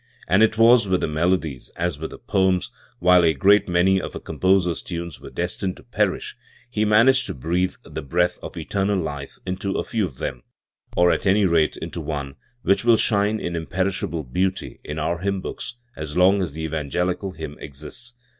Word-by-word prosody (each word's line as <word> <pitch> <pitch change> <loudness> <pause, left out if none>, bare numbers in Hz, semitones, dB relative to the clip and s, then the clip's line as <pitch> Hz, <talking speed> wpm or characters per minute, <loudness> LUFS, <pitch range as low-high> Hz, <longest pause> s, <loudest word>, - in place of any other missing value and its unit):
.And 95 +3 +4
it 110 0 +4
was 115 -1 +6
with 95 -1 +1
the - - 0
melodies 80 -3 0
as 85 -3 -2
with 80 - -4
the - - -10
poems: 95 -2 +1 0.3
while 90 0 +5
a 80 -2 +3
great 100 +7 +4
many 95 +2 +3
of - - -6
a - - -4
composer's 95 -2 +1
times 85 -3 -6
were - - -9
destined 90 +2 -2
to - - -15
perish, - - -1 0.3
he 110 -3 0
managed 115 +5 +5
to - - -5
breathe 90 +7 -1
the - - -6
breath 90 +5 0
of - - -8
eternal 100 0 0
life 75 -5 -5
into 95 +1 -2
a - - 0
few 110 -3 -1
of 70 -8 -9
them, 65 - -4 0.6
or 90 0 +5
at - - 0
any 100 +2 +4
rate 85 -3 +2
into - - -5
one, 70 -3 -4 0.3
which 100 - +2
will 120 -1 +5
shine 105 0 +2
in 85 - -3
imperishable 85 -1 -2
beauty 90 +9 -2
in 75 - -6
our 85 +2 -1
hymn 100 +1 -1
books 120 - -6 0.2
as 75 +1 -5
long 95 +2 +5
as 85 -6 -3
the 80 +1 -5
evangelical 90 +5 -2
hymn 80 -3 -7
exists. 75 - -7
90 Hz, 190 wpm, -23 LUFS, 80-100 Hz, 0.6 s, was